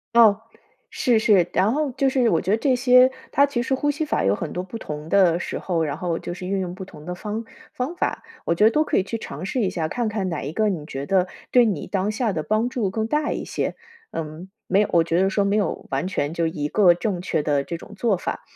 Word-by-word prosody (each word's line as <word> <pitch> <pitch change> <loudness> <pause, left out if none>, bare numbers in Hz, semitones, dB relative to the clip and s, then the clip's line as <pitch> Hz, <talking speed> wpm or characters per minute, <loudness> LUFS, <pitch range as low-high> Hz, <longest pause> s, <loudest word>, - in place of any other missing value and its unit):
哦， 220 -3 +6 0.5
是 240 -5 +2
是， 200 -5 +4
然 195 +4 +3
后 295 +2 0
就 270 +2 +1
是 260 -2 +2
我 165 - +2
觉 190 - -1
得 215 - +4
这 260 +2 +2
些 250 0 +6 0.2
它 280 - +5
其 265 -4 -2
实 265 - -1
呼 290 +2 +1
吸 290 +2 -1
法 300 - 0
有 100 +1 +3
很 - - -5
多 180 - -3
不 190 +5 -7
同 150 -7 -7
的 175 -2 +4
时 - - -4
候， 170 -3 -1
然 145 - -3
后 170 -2 -2
就 - - -5
是 180 +1 -7
运 195 +1 -1
用 180 -1 -4
不 190 - -7
同 150 -5 -12
的 180 +1 -4
方 215 +4 -5 0.3
方 260 +7 -3
法， - - -1 0.2
我 - - +2
觉 210 +5 +3
得 220 - +6
都 305 +5 +3
可 - - 0
以 - - +3
去 230 +4 -4
尝 180 -6 -7
试 245 +6 -1
一 195 - +1
下， 165 -4 -2
看 235 +6 -2
看 205 -3 -2
哪 165 -4 -3
一 140 - -4
个 215 +6 +1
你 175 -7 -2
觉 135 -2 -5
得 185 +2 +2 0.2
对 245 -1 +5
你 195 -9 -2
当 195 +1 -1
下 220 -1 -1
的 155 -3 -2
帮 215 +5 +1
助 240 -5 -1
更 220 +2 -1
大 300 +5 0
一 - - -3
些 - - -2 0.4
嗯， 160 +3 -6 0.2
没 195 +2 +3
有 210 - 0
我 170 - +5
觉 170 +2 +1
得 190 - +3
说 200 +1 +1
没 200 +1 +1
有 205 -5 -1
完 135 +3 -1
全 150 -5 -2
就 170 0 0
一 150 -2 -2
个 180 +2 +5
正 175 +1 -2
确 180 -4 -1
的 145 -2 +1
这 170 - -5
种 205 - -13
做 205 -1 +1
法。 - - -4
195 Hz, 290 characters per minute, -23 LUFS, 170-230 Hz, 0.5 s, 哦